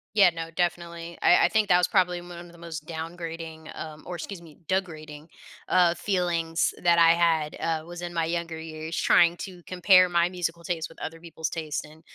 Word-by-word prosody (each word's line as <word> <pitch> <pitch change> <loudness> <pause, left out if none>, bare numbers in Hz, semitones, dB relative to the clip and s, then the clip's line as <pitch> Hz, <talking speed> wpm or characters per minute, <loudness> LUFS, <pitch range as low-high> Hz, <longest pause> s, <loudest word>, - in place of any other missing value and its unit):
Yeah, 195 -4 +7
no, 165 -1 -6
definitely. 170 0 -3
I - - +5
I - - +2
think 215 -2 +2
that 180 - +5
was 180 0 +2
probably 180 -2 +2
mu 175 - -12
one 175 0 -9
of 175 - -15
the - - -16
most 160 -3 -7
downgrading, 165 -1 -7
um 155 -1 -7
or 180 - -5
excuse 175 +1 -7
me, 160 -3 -15
degrading, 155 -5 -3 0.4
uh, 175 -2 +4
feelings 175 -3 0
that 170 -1 +4
I 165 0 +7
had, 165 -3 +1
uh, 160 -1 -1
was 175 0 -8
in 175 0 -5
my 165 -1 0
younger 165 0 -3
years 160 0 -6
trying 170 0 +4
to 180 -2 -11
compare 185 +1 +5
my 175 0 +2
musical 170 -2 -4
taste 165 -2 -3
with 165 - -16
other 165 +1 -6
people's 160 -1 -5
taste 155 -3 -4
and 155 +1 -15
170 Hz, 205 wpm, -26 LUFS, 160-175 Hz, 0.4 s, Yeah